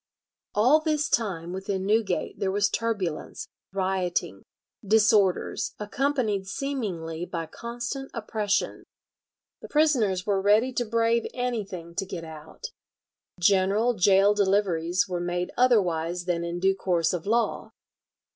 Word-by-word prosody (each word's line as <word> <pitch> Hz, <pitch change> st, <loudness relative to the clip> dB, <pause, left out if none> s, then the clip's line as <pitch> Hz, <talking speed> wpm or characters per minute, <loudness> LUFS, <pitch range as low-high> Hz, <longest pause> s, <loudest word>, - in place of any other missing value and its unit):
All 250 Hz, +9 st, +5 dB
this 305 Hz, -2 st, 0 dB
time 180 Hz, -9 st, -1 dB
within 190 Hz, 0 st, -3 dB
Newgate 210 Hz, -3 st, 0 dB
there 195 Hz, -, 0 dB
was 200 Hz, +1 st, +2 dB
turbulence, 205 Hz, -9 st, -3 dB, 0.2 s
rioting, 185 Hz, -, -1 dB, 0.4 s
disorders, 210 Hz, -2 st, +2 dB
accompanied 215 Hz, -3 st, -1 dB
seemingly 190 Hz, -, -4 dB
by 170 Hz, -2 st, -4 dB
constant 240 Hz, -, -6 dB
oppression. 215 Hz, -3 st, -2 dB, 0.8 s
The -, -, -8 dB
prisoners 240 Hz, -12 st, +2 dB
were 200 Hz, -2 st, +1 dB
ready 215 Hz, +6 st, +3 dB
to 240 Hz, -, -1 dB
brave 230 Hz, +1 st, +1 dB
anything 205 Hz, -9 st, -4 dB
to 195 Hz, +3 st, -2 dB
get 175 Hz, -3 st, -6 dB
out. 160 Hz, -, -10 dB, 0.7 s
General 200 Hz, +6 st, +3 dB
gaol 195 Hz, 0 st, +4 dB
deliveries 190 Hz, -4 st, +1 dB
were 180 Hz, -2 st, -3 dB
made 175 Hz, 0 st, -2 dB
otherwise 180 Hz, -8 st, +2 dB
than 170 Hz, -2 st, -1 dB
in 170 Hz, +1 st, -4 dB
due 190 Hz, +1 st, +3 dB
course 175 Hz, -3 st, 0 dB
of 180 Hz, +1 st, -4 dB
law. 230 Hz, +2 st, 0 dB
200 Hz, 120 wpm, -26 LUFS, 180-230 Hz, 0.8 s, All